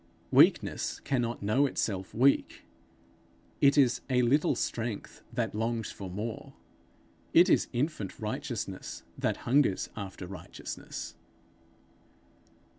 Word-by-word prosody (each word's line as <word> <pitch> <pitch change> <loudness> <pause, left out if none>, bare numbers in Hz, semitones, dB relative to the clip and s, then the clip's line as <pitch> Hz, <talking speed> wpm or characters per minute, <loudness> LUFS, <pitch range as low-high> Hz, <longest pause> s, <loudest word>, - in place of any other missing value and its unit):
Weakness - - +4
cannot 120 -5 -1
know 130 +8 +3
itself 95 -7 -2
weak. 135 +5 +2 1.0
It 140 0 +5
is 130 -4 +4
a 125 -1 +3
little 140 +6 +3
strength 115 -3 -3
that - - -1
longs 115 +1 -2
for 95 -2 -7
more; 105 +5 -5 0.8
it 175 +3 +7
is - - +4
infant 125 - -2
righteousness 110 -4 -4 0.2
that - - 0
hungers 130 -6 +2
after 95 -3 -6
righteousness. 90 +1 -7
115 Hz, 105 wpm, -30 LUFS, 105-135 Hz, 1.0 s, it